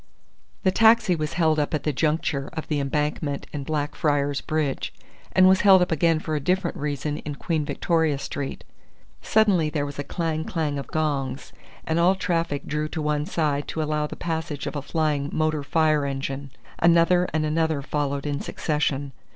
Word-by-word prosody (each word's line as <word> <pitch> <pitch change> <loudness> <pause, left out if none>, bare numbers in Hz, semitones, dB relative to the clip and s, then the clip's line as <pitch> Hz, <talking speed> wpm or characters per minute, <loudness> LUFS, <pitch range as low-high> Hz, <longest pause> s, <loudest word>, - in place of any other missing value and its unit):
The 190 - +4
taxi 220 -3 +5
was 155 -2 -3
held 160 -3 +2
up 150 +1 0
at 150 - -3
the 150 - 0
juncture 150 -1 0
of 160 - -5
the 150 -2 0
Embankment 150 +1 -1
and 145 -2 -3
Blackfriars 145 -1 0
Bridge, 155 -3 -2 0.4
and 185 0 +6
was 190 0 +5
held 190 -3 +7
up 180 - -3
again 165 +1 +3
for 155 0 -3
a - - 0
different 180 +4 0
reason 150 +1 -3
in 150 -1 -6
Queen 160 +1 -1
Victoria 160 -2 +1
Street. 140 0 -5 0.6
Suddenly 200 -8 +3
there 150 -2 -1
was 145 0 -7
a - - -1
clang 160 -1 -2
clang 155 -4 -2
of 140 - -7
gongs, 140 -4 -2 0.3
and 160 +1 0
all 180 +3 +4
traffic 165 -6 -1
drew 150 +1 -2
to 160 - -4
one 150 0 0
side 145 -3 0
to 160 - -2
allow 150 0 -1
the - - -7
passage 160 -4 -3
of - - -4
a 145 - -2
flying 150 -1 -1
motor 155 -1 0
fire 155 +1 +2
engine. 135 0 -4 0.3
Another 170 +1 +4
and 155 -1 0
another 155 -2 0
followed 140 -1 -2
in 145 -1 -1
succession. 145 -2 -1
155 Hz, 180 wpm, -24 LUFS, 145-165 Hz, 0.6 s, held